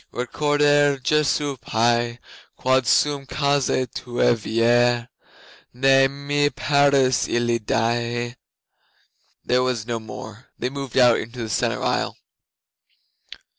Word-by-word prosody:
'Recordare 145 +2 +1
Jesu 145 +1 0
pie, 120 +1 0 0.4
Quod 130 -1 +1
sum 145 -2 +1
causa 140 -3 0
Tuae 120 -1 0
viae, 120 +2 +1 0.7
Ne 135 +1 +4
me 145 +1 -1
perdas 140 -1 +2
illi 120 0 0
die!' 120 +2 -2 1.1
There 125 0 +2
was 125 -4 -2
no 120 -1 -3
more. 110 +1 -10
They 125 - -3
moved 140 -2 -6
out 125 -2 +5
into 120 +1 -7
the 110 - -6
centre 105 - -1
aisle. - - -1
125 Hz, 105 wpm, -22 LUFS, 120-140 Hz, 1.1 s, out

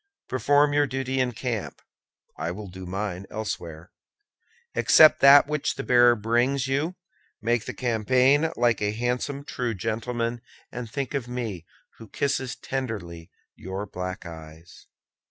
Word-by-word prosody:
Perform 145 +4 +3
your 145 0 +3
duty 130 0 -2
in 125 -1 0
camp; 115 -2 -4 0.6
I 80 +2 -3
will 100 +4 -6
do 95 0 -9
mine 95 0 -4
elsewhere. 85 -6 -6 0.8
Accept 155 -1 +6
that 140 +1 +8
which 150 -1 -2
the - - -5
bearer 120 -1 +5
brings 120 +5 +1
you; 145 +7 -1 0.4
make 115 0 0
the - - -5
campaign 130 +6 +2
like 120 -3 +2
a 105 0 0
handsome 125 +5 -2
true 120 -5 -3
gentleman, 115 +3 -3 0.3
and 120 -2 -6
think 140 +4 -4
of 135 -4 -2
me, 115 -9 -5 0.3
who 115 - -11
kisses 135 -1 -1
tenderly 100 -11 -5 0.3
your 95 +2 -6
black 90 -1 -6
eyes. 80 +1 -12
120 Hz, 135 wpm, -25 LUFS, 100-130 Hz, 0.8 s, that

